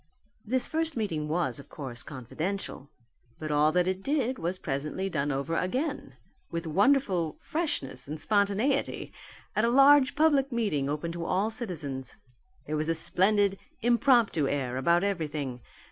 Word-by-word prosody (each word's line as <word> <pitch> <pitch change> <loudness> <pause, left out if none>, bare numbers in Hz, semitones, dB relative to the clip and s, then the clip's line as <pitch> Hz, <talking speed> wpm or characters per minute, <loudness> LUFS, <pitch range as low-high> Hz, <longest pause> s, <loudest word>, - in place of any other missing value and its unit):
This 255 +3 +2
first 320 -3 -1
meeting 165 -9 -2
was, 165 -1 -1
of 140 - -13
course, 125 -5 -7
confidential. 150 - -5 0.5
But 155 -1 -5
all 150 +1 +4
that 180 0 +2
it 190 0 -1
did 265 -1 0
was 175 +3 -2
presently 150 +7 -3
done 145 -1 0
over 140 +4 -2
again, 250 - -2 0.3
with 170 0 -4
wonderful 190 - +2
freshness 140 - -3
and 155 +2 -5
spontaneity 205 - +1 0.4
at 215 - +2
a 235 - +3
large 275 +2 +6
public 285 -3 +3
meeting 200 - 0
open 150 +3 -2
to 170 0 -5
all 195 +6 +1
citizens. 150 - -4 0.5
There 155 +1 -2
was 155 +1 -1
a 165 - +2
splendid 195 +4 +2 0.2
impromptu 235 - +3
air 130 -3 -1
about 170 +7 +3
everything. 150 -10 -2
180 Hz, 145 wpm, -28 LUFS, 150-235 Hz, 0.5 s, large